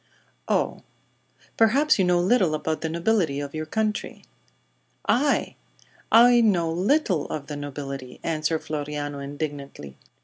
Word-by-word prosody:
"Oh. - - 0 0.8
Perhaps 260 +5 +4
you 190 - +4
know 180 0 +3
little 185 -3 +2
about 155 +1 -3
the 160 - -2
nobility 170 -3 0
of 145 -1 -6
your 155 0 -4
country." 215 +3 -2 0.8
"I! 285 +4 +1 0.5
I 240 +1 +7
know 175 -7 +2
little 185 - +1
of 145 -2 -5
the 145 - -6
nobility!" 140 -2 -7
answered 160 0 -1
Floriano, 145 -1 -4
indignantly. 140 - -6
160 Hz, 125 wpm, -24 LUFS, 145-210 Hz, 0.8 s, I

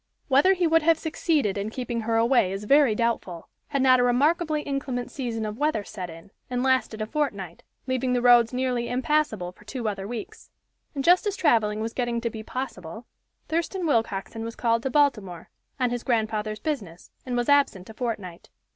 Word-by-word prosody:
Whether 285 +8 +5
he 360 -1 +1
would 325 0 +4
have 325 +1 +4
succeeded 305 - 0
in 200 +2 -3
keeping 240 0 -4
her 225 +1 -1
away 230 -4 +3
is 195 +2 -4
very 275 0 +4
doubtful, 220 -7 -2 0.2
had 275 -1 0
not 255 -1 +6
a - - +3
remarkably 300 +5 +2
inclement 270 -3 -3
season 235 -5 -3
of 215 +3 -5
weather 295 -8 +1
set 185 -4 -7
in, 165 +4 -12 0.2
and 250 0 -1
lasted 260 -4 +1
a - - -2
fortnight, 210 - -3 0.2
leaving 260 -1 0
the 245 - +1
roads 240 -2 +6
nearly 250 -2 -1
impassable 250 -7 0
for 185 - -20
two 235 +1 -5
other 195 -2 -3
weeks. 230 -1 -8 0.5
And 275 - -2
just 360 +6 +4
as 405 - -1
traveling 220 - +2
was 225 +1 -3
getting 240 -2 -1
to 235 -1 -2
be 220 - -7
possible, 220 -4 -6 0.4
Thurston 340 +3 -2
Willcoxen 225 -5 -1
was 230 0 -6
called 230 -1 +1
to 265 - -2
Baltimore, 215 - 0 0.3
on 250 -2 +1
his 245 -1 -2
grandfather's 215 -3 -1
business, 210 - -5
and 250 -1 -3
was 240 - 0
absent 280 -10 +2
a 220 - -10
fortnight. 210 -8 -5
240 Hz, 190 wpm, -25 LUFS, 215-275 Hz, 0.5 s, not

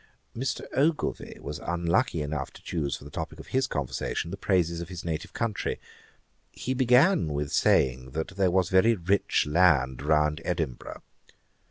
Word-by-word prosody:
Mr. 130 +3 -2
Ogilvie 150 +3 0
was 75 +1 -6
unlucky 85 - 0
enough 70 -2 -3
to - - -16
choose 75 -5 -2
for - - -14
the 75 - -11
topick 80 -1 -5
of - - -11
his 130 0 +1
conversation 70 - -3
the - - -3
praises 85 -4 0
of 85 - -7
his 90 -2 -7
native 80 -2 -3
country. 115 -4 -2 0.7
He 130 - -3
began 130 - +4
with 70 0 -2
saying, 65 0 +2
that 80 +3 -2
there 95 -1 +1
was 90 -1 +2
very 110 +5 +4
rich 95 +2 +1
land 75 -6 +3
round 75 +1 +2
Edinburgh. 80 -8 -4
85 Hz, 160 wpm, -27 LUFS, 75-100 Hz, 0.7 s, began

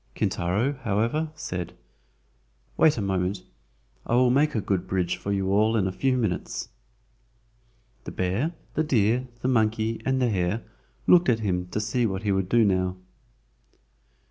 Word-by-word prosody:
Kintaro, 100 +11 0
however, 115 +8 0
said: 90 - -5 1.0
"Wait 155 - +4
a 105 - -1
moment. 95 0 -1 0.6
I 120 - +1
will 125 0 +4
make 145 +2 +2
a - - +2
good 95 -3 -1
bridge 90 -2 0
for 100 - -5
you 95 -1 0
all 110 +3 +3
in 100 - +1
a 95 - -1
few 130 +6 0
minutes." 110 -8 -2 1.4
The - - -5
bear, 100 - -1 0.2
the 155 - +1
deer, 125 -3 +1
the 125 - -1
monkey 110 -2 +1
and 130 +1 +1
the 125 -2 +2
hare 95 +3 -1 0.4
looked 175 -5 +5
at 115 -2 +2
him 90 -4 -1
to 105 - -3
see 115 +2 0
what 95 0 -4
he 105 - +1
would 95 -1 0
do 115 0 +4
now. 95 -2 +1
110 Hz, 160 wpm, -26 LUFS, 95-125 Hz, 1.4 s, looked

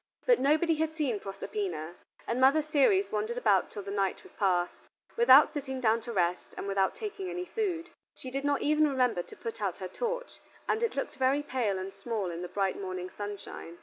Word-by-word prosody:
But - - +5
nobody 310 +4 +3
had 315 0 -1
seen 270 -9 0
Proserpina, 195 - -4 0.3
and 240 +2 -1
Mother 280 +4 +5
Ceres 310 +7 +3
wandered 215 +3 -2
about 205 -6 +3
till 205 - -7
the 200 - -6
night 195 -1 -1
was - - -15
passed, 180 -3 0 0.3
without 470 +1 +7
sitting 265 -3 -4
down 230 -2 +2
to 235 - -6
rest, 180 -4 -1
and - - -4
without 195 -1 +1
taking 400 -3 -5
any 360 0 -4
food. 355 -6 -2 0.2
She 255 - -8
did 275 +1 -2
not 285 -1 +1
even 305 0 +4
remember 250 -8 +1
to - - -12
put 230 -1 -6
out 195 -4 -1
her 185 - -5
torch, - - -4 0.3
and 435 - +1
it 465 - 0
looked 275 - -3
very 270 +2 +2
pale 235 -8 -1
and 190 +1 -5
small 195 -2 -3
in 170 +1 -5
the 180 - -4
bright 195 -1 -1
morning 185 -1 -5
sunshine. 205 -4 -7
250 Hz, 205 wpm, -30 LUFS, 195-310 Hz, 0.3 s, without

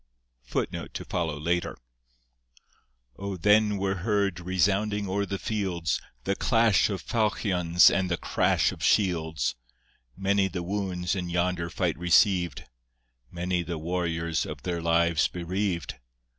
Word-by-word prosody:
{25a} 85 +1 -2 1.4
O 100 -1 -4
then 105 +3 +3
were 95 0 -1
heard 100 -2 0
resounding 100 +3 0
o'er 100 +2 -1
the 100 - -3
fields 90 -10 -2 0.2
The 100 - 0
clash 115 -8 +3
of 95 -4 -4
faulchions 90 -6 +3
and 95 -1 0
the 85 - 0
crash - - +1
of - - -10
shields! 80 - +1 0.6
Many 95 0 +2
the 90 -1 -5
wounds 90 -2 -2
in 90 -2 -3
yonder 85 0 -1
fight 85 -1 -1
receiv'd! 90 - +3 0.7
Many 90 +1 -1
the 85 -1 -4
warriors 85 -1 -1
of - - -7
their 85 -2 -2
lives 85 -1 +2
bereaved! 90 -4 -3
90 Hz, 115 wpm, -27 LUFS, 85-100 Hz, 1.4 s, then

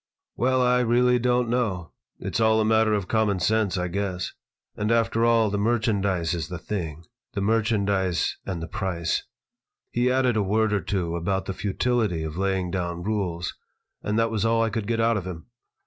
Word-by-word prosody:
"Well, 130 +1 +2
I 125 0 +3
really 125 +1 +3
don't 125 0 +2
know. 110 -9 -1 0.3
It's - - -3
all 110 0 +4
a 110 - +2
matter 110 0 +3
of 100 -3 -2
common 105 -3 +1
sense, 110 -1 +1
I 90 0 -1
guess. 95 0 -3 0.4
And, 105 +2 -1
after 115 0 +2
all, 115 -2 +4
the 100 - -1
merchandise 100 -6 +1
is 85 -2 -3
the 90 - -5
thing, 85 -4 -5 0.3
the 100 - -2
merchandise 100 -4 +1
and 90 -4 -4
the - - -5
price." 90 -4 -1 0.7
He 120 +1 +2
added 130 -2 +2
a - - +3
word 105 +2 +1
or 100 - +1
two 90 -2 -2
about 95 +3 -1
the 95 - -3
futility 105 -3 0
of 80 -1 -5
laying 95 -1 -1
down 85 -2 -3
rules, 95 -5 -2 0.5
and 105 +1 -1
that 115 0 +2
was 110 -2 -1
all 115 0 +3
I 115 - 0
could 105 -1 -3
get 115 0 0
out 115 0 +3
of 95 -2 -4
him. 85 -3 -7
105 Hz, 190 wpm, -25 LUFS, 90-115 Hz, 0.7 s, all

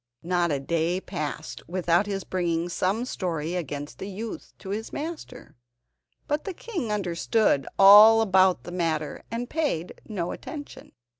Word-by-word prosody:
Not 175 0 +1
a 140 - 0
day 170 +5 0
passed 155 -3 -5
without 175 +2 +1
his 195 -2 -3
bringing 175 -2 -1
some 195 +7 0
story 170 - -3
against 145 -4 -5
the 195 - -5
youth 215 +4 -7
to 190 - -10
his 215 +3 -4
master, 310 -4 -7 0.7
but 295 +1 -1
the 390 -3 -5
king 335 - -4
understood 185 - +1
all 210 +3 +9
about 190 -3 +3
the 175 - -8
matter 160 -4 -2
and 235 +2 -3
paid 285 - -2
no 180 -6 -3
attention. 290 -2 -9
185 Hz, 145 wpm, -26 LUFS, 170-225 Hz, 0.7 s, all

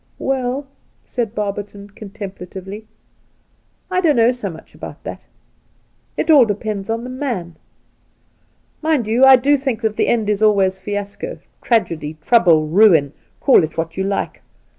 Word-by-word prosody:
Well,' 265 +1 -2 0.4
said 235 -3 -3
Barberton 205 0 -5
contemplatively, 200 0 -9 0.5
' - - -41
I 365 0 +1
don't 320 -5 +3
know 235 0 +4
so 245 -5 -4
much 160 -2 -12
about - - -10
that. - - -7 1.0
It 320 - +1
aU 290 -5 +8
depends 210 -1 -4
upon 230 +1 -2
the 250 - -7
man. 235 - -4 1.3
Mind 310 -7 +1
you, 230 +4 +2
I 265 0 +9
do 275 +3 +3
think 265 -5 -2
that 220 -1 -1
the - - +1
end 225 -3 +1
is 210 0 0
always 195 -3 +3
fiasco 205 - -5
— - - -43
tragedy, 160 -10 -1
trouble, 170 -10 +4
ruin, 160 -4 +4 0.3
call 265 - +5
it 160 +1 -5
what 165 0 -3
you 190 - -1
like. 195 +1 -3
210 Hz, 155 wpm, -19 LUFS, 190-250 Hz, 1.3 s, I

